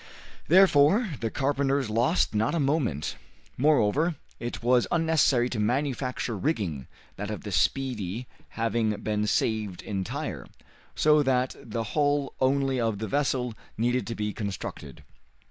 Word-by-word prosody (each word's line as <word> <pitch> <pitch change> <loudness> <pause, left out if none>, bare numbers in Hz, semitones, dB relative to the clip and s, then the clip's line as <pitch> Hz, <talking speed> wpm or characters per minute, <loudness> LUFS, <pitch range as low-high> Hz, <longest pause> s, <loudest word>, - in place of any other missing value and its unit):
Therefore 185 +4 +5
the 115 - -1
carpenters 140 0 0
lost 120 +10 +2
not 110 +9 +1
a - - +1
moment. 135 - 0 0.4
Moreover, 150 +3 +2 0.2
it 120 0 -5
was 125 0 +3
unnecessary 160 -7 +3
to 115 - -2
manufacture 125 +1 -1
rigging, 95 - -2 0.3
that 105 +1 -4
of 105 - -5
the 105 - -6
"Speedy" 110 - 0 0.3
having 115 -1 +1
been 105 0 0
saved 105 -3 -1
entire, 100 - -4 0.5
so 150 0 +4
that 130 -2 +1
the 115 0 -4
hull 145 -2 +1
only 135 0 +2
of 115 -3 0
the 110 +2 -4
vessel 130 -3 0 0.2
needed 120 +3 0
to 115 - -4
be 105 -1 -2
constructed. 100 -4 -6
125 Hz, 130 wpm, -27 LUFS, 105-140 Hz, 0.5 s, Therefore